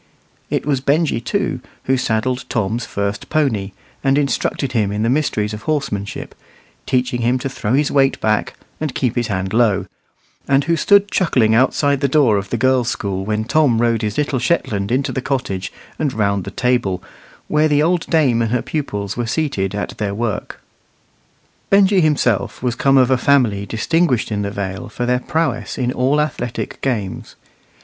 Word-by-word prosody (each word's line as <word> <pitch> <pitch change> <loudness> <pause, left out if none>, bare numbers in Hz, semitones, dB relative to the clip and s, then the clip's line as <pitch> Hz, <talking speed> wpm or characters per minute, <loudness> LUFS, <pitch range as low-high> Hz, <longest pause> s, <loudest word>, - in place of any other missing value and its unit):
It - - -1
was 140 -3 0
Benjy, 140 -3 +1
too, - - -1 0.2
who 135 - +2
saddled 125 0 -1
Tom's 110 +2 -1
first 100 0 -3
pony, 115 -11 0 0.3
and 135 +1 +3
instructed 140 -1 0
him 105 -4 +1
in 105 +1 -1
the 115 - +2
mysteries 110 -7 0
of 105 - -6
horsemanship, 125 -9 -3 0.5
teaching 125 -2 0
him 120 +2 +2
to 130 - -3
throw 115 -4 -3
his 145 +2 +2
weight 135 -1 +2
back 110 -1 0 0.2
and 155 -4 -3
keep 125 -3 0
his 120 -2 0
hand 95 -2 -2
low, 110 -4 +2 0.6
and 135 +1 +3
who 170 +2 +1
stood 200 +4 +4
chuckling 125 - +2
outside 135 +3 +2
the 140 - +3
door 135 -7 +3
of 100 0 -4
the 120 - -1
girls' 130 0 +2
school 95 -2 -3
when 105 +1 -1
Tom 125 -1 +2
rode 115 -1 +2
his 105 -2 -2
little 145 -3 0
Shetland 105 -8 0
into 130 +2 +1
the 130 - -2
cottage 125 -9 -2 0.3
and 150 -3 0
round 100 -3 0
the - - -4
table, 120 -8 0 0.4
where 150 +1 +3
the 150 -1 +3
old 170 +1 +1
dame 135 -8 +3
and 115 - 0
her 120 +1 0
pupils 105 -10 -3
were 120 -1 -2
seated 115 - -1
at 100 - -5
their 100 -1 -2
work. 110 -2 -4 1.1
Benjy 195 -1 +5
himself 140 - +1
was 125 -2 +1
come 135 +3 +3
of 130 0 +4
a 130 - +3
family 115 -8 +2
distinguished 130 0 +1
in 105 -1 -1
the 100 - -2
Vale 100 -1 -5
for 115 +3 -3
their 125 0 +1
prowess 160 -6 -2
in 125 -1 0
all 130 +4 +1
athletic 135 -5 -3
games. 110 -9 -3
125 Hz, 180 wpm, -19 LUFS, 105-140 Hz, 1.1 s, Benjy